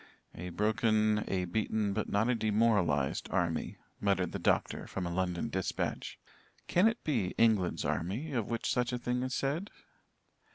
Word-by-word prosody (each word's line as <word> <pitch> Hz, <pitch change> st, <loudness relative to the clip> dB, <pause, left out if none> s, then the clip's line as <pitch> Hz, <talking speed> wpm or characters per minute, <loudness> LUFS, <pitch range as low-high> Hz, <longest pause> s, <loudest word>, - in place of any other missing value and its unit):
"'A 90 Hz, +2 st, -6 dB
broken, 110 Hz, +2 st, +2 dB
a 90 Hz, -1 st, 0 dB
beaten, 105 Hz, +2 st, 0 dB
but 110 Hz, +1 st, -2 dB
not 105 Hz, +3 st, +2 dB
a 125 Hz, -, +3 dB
demoralized, 105 Hz, -, +1 dB
army,'" -, -, -1 dB, 0.2 s
muttered 95 Hz, -3 st, +1 dB
the -, -, -4 dB
doctor, -, -, 0 dB
from 95 Hz, -, -4 dB
a 85 Hz, -, -3 dB
London 90 Hz, +3 st, -1 dB
dispatch. 95 Hz, -5 st, -3 dB, 0.5 s
"Can 180 Hz, +5 st, +4 dB
it 225 Hz, +1 st, -1 dB
be 115 Hz, -12 st, 0 dB
England's 110 Hz, -6 st, +3 dB
army 110 Hz, -, -2 dB
of 120 Hz, -6 st, -1 dB
which 115 Hz, -1 st, -2 dB
such 125 Hz, 0 st, +1 dB
a 125 Hz, -, -1 dB
thing 125 Hz, +1 st, -1 dB
is 130 Hz, 0 st, -2 dB
said?" 155 Hz, +9 st, -1 dB
110 Hz, 160 wpm, -32 LUFS, 95-120 Hz, 0.5 s, Can